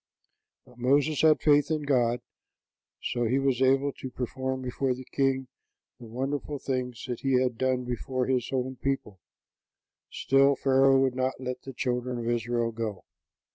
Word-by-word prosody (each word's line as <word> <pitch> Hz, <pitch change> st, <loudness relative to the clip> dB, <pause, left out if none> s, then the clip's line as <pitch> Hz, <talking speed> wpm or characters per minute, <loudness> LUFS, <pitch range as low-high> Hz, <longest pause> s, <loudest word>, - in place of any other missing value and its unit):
But 125 Hz, 0 st, -19 dB
Moses 140 Hz, +4 st, +2 dB
had 155 Hz, -1 st, +5 dB
faith 145 Hz, -1 st, +4 dB
in 155 Hz, -2 st, -1 dB
God; 125 Hz, -4 st, +1 dB, 0.8 s
so 120 Hz, -1 st, -1 dB
he 125 Hz, +4 st, +2 dB
was 135 Hz, -2 st, +1 dB
able 135 Hz, +2 st, +3 dB
to 130 Hz, -, -7 dB
perform 130 Hz, +1 st, -4 dB
before 130 Hz, +1 st, -1 dB
the 130 Hz, +1 st, -10 dB
king 135 Hz, -1 st, 0 dB, 0.5 s
the 120 Hz, -, -10 dB
wonderful 135 Hz, +5 st, -3 dB
things 125 Hz, -3 st, -3 dB
that 125 Hz, -3 st, -4 dB
he 135 Hz, -2 st, +2 dB
had 125 Hz, -2 st, 0 dB
done 130 Hz, +1 st, 0 dB
before 125 Hz, +1 st, -2 dB
his 125 Hz, -2 st, 0 dB
own 130 Hz, 0 st, -2 dB
people; 135 Hz, -8 st, -3 dB, 0.9 s
still, 135 Hz, +1 st, +3 dB
Pharaoh 135 Hz, 0 st, +4 dB
would 135 Hz, -1 st, +2 dB
not 130 Hz, 0 st, -1 dB
let 125 Hz, -1 st, -5 dB
the 135 Hz, -, -9 dB
children 125 Hz, 0 st, -2 dB
of 115 Hz, -1 st, -4 dB
Israel 120 Hz, 0 st, 0 dB
go. 110 Hz, -3 st, -5 dB
130 Hz, 160 wpm, -28 LUFS, 125-135 Hz, 0.9 s, had